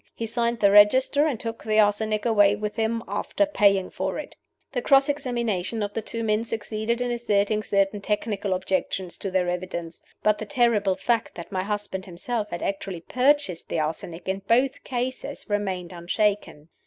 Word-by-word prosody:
He 230 - -3
signed 235 0 -1
the 200 -1 +5
register, 260 +8 +5
and 265 -8 -2
took 230 0 -5
the 215 -1 0
arsenic 215 +1 +2
away 205 -3 +5
with 210 0 -4
him, 230 0 -1
after 305 - 0
paying 200 -9 +2
for - - -3
it." - - -7 0.4
The 245 - -1
cross 275 +2 +5
examination 235 -7 -1
of 205 0 -4
the 225 - -2
two 230 +1 -4
men 215 0 +1
succeeded 225 +1 -2
in 245 0 0
asserting 215 -3 +1
certain 200 -1 +1
technical 205 -2 -1
objections 185 -1 -2
to 195 - -3
their 185 -1 +1
evidence. 175 -2 -4 0.2
But 215 0 +3
the 215 - -5
terrible 210 -5 +2
fact 230 +1 -1
that 170 - -9
my 185 -1 -1
husband 205 -1 -4
himself 210 +5 -3
had 175 - -5
actually 195 -3 -3
purchased 255 - +1
the - - -1
arsenic 165 +3 -4
in 190 +1 -1
both 255 +4 +2
cases 255 +1 -4
remained 190 -4 -2
unshaken. 175 -3 -1
210 Hz, 175 wpm, -25 LUFS, 190-235 Hz, 0.4 s, the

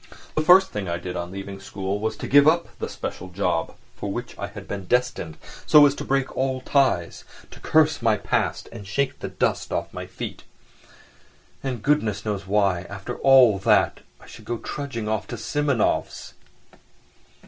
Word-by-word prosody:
The 155 - +1
first 180 +4 +6
thing 100 -3 -4
I 85 - -1
did 90 +1 -6
on 85 0 -4
leaving 95 0 -7
school 100 0 -4
was 110 +1 -2
to - - -5
give 145 +1 +6
up 170 +2 +3
the - - -3
special 95 - -6
job 90 -3 -1 0.2
for 100 - -4
which 120 +4 -5
I 100 - -5
had 100 -1 -10
been 100 -2 -5
destined 125 -8 -1 0.3
so 150 -1 +8
as 140 - +3
to - - -6
break 135 0 -1
all 130 0 -1
ties, 130 -12 +1 0.3
to - - -12
curse 155 -2 +3
my 110 -2 +3
past - - -1
and 105 -4 -9
shake 135 +6 -1
the - - -4
dust - - -1
from - - -1
off - - -5
my - - -6
feet.... - - -7 1.2
And 125 -5 -4
goodness 125 -10 +1
knows 100 -3 -3
why, 95 -3 +1
after 100 +4 -6
all 130 -7 +6
that, 95 - +3 0.2
I - - -16
should - - -13
go 120 - -2
trudging 115 -1 -5
off 110 -2 -2
to 120 - -6
Simonov's! 140 0 -1
110 Hz, 180 wpm, -24 LUFS, 100-135 Hz, 1.2 s, so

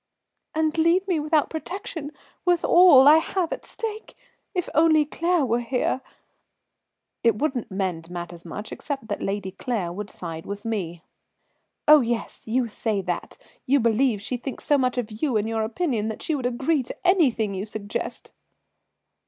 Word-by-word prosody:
"And 315 0 +1
leave 345 +4 +3
me 355 -5 +1
without 300 0 +1
protection, 325 -2 -5 0.3
with 355 -2 +2
all 345 -7 +8
I 305 +2 +9
have 345 +1 -1
at - - -8
stake? 440 -1 -6 0.4
If 360 - -1
only 315 -1 +5
Claire 335 +1 +1
was 240 0 0
here." 255 +1 0 1.2
"It 230 -3 +3
wouldn't 265 -4 -1
mend 185 -4 -3
matters 175 -1 -7
much, 210 +5 -7
except 275 -6 -5
that 205 - -3
Lady 195 -1 -2
Claire 195 -6 -3
would 205 +2 -6
side 165 -3 -7
with 200 +1 -6
me." 180 -7 -3 0.8
"Oh, 300 -1 +9
yes, 235 -1 -3
you 240 +2 +1
say 215 -2 -2
that, 175 -1 -4 0.3
you 280 +2 +4
believe 230 -2 +2
she 250 - -2
thinks 260 +2 -7
so 295 - +3
much 255 -1 0
of 235 -3 -2
you 270 -7 +2
and 210 +1 0
your 225 0 -1
opinion 225 -1 -1
that 220 - -5
she 320 - -1
would 260 -4 0
agree 270 +5 +1
to 260 +8 -6
anything 255 - +3
you 195 +2 -4
suggest." 210 -1 -5
245 Hz, 165 wpm, -24 LUFS, 210-310 Hz, 1.2 s, I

